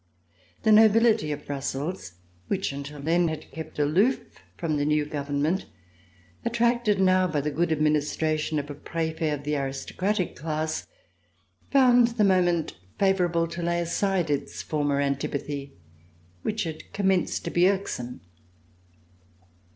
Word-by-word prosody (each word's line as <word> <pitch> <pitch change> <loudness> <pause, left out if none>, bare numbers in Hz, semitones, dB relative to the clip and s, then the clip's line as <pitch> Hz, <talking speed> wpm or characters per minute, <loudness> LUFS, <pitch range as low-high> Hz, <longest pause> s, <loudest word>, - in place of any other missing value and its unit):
The 220 - +4
nobility 220 -6 +5
of 145 0 -5
Brussels, 140 - -4 0.3
which 190 -5 -1
until 140 +1 -7
then 165 +4 +2
had 155 -1 -5
kept 160 -1 -8
aloof 180 - +3 0.4
from 155 -3 -1
the 145 - 0
new 150 0 +2
government, 145 +4 -1 0.8
attracted 235 -3 +2
now 185 -1 +4
by 155 -4 -1
the 150 +1 -2
good 165 +3 0
administration 155 0 +1
of 145 0 -3
a - - -4
Prefet 160 +1 -2
of 145 -1 -3
the 150 +1 -1
aristocratic 155 +8 -2
class, 155 +1 -3 0.8
found 245 -3 +6
the 215 - +4
moment 175 -4 +2 0.2
favorable 180 -4 +2
to 170 +1 -5
lay 170 0 0
aside 175 -1 0
its 140 - -3
for 150 -2 -2
mer 140 -1 +1
antipathy, 140 0 -3 0.7
which 215 0 -1
had 160 -2 -7
commenced 190 -3 +1
to - - -3
be 175 +2 +4
irksome. 125 - -3
160 Hz, 135 wpm, -26 LUFS, 145-190 Hz, 0.8 s, found